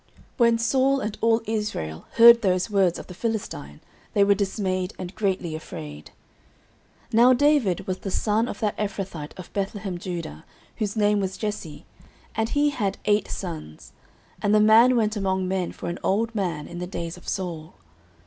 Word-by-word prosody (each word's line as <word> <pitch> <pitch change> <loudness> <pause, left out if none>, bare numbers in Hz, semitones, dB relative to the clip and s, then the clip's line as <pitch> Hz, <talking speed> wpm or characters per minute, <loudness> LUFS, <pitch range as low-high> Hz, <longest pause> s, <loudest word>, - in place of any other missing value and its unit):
09:017:011 - - -35 0.3
When 235 -1 +4
Saul 265 +4 +2
and 215 -3 -4
all 230 0 +3
Israel 210 - -3
heard 235 0 +8
those 185 +1 +1
words 190 -4 +3
of - - -8
the - - -10
Philistine, 195 - -4 0.3
they 200 - +5
were 200 0 +5
dismayed, 190 -1 -2
and 180 +1 -6
greatly 190 -6 -1
afraid. 75 - -8 1.0
09:017:012 - - -22
Now 240 +3 +7
David 270 - +2
was 185 0 -3
the 195 - -5
son 215 +4 +1
of - - -6
that 210 -2 0
Ephrathite 195 -7 -4
of 185 - -11
Bethlehemjudah, 185 - -4 0.4
whose 210 -1 -2
name 210 -1 +3
was 190 -1 -3
Jesse; 205 -8 -5 0.5
and 220 0 -1
he 290 0 +2
had 200 -8 -2
eight 210 0 +2
sons: 160 - -7 0.5
and 205 +1 +3
the - - +6
man 225 +4 +6
went 220 -2 +1
among 190 -2 0
men 185 -1 -1
for - - -8
an 175 - -4
old 225 +4 0
man 175 -8 -2
in 175 - -8
the 180 - -4
days 170 -2 -5
of 180 - -16
Saul. 170 -5 -4
200 Hz, 175 wpm, -25 LUFS, 180-220 Hz, 1.0 s, heard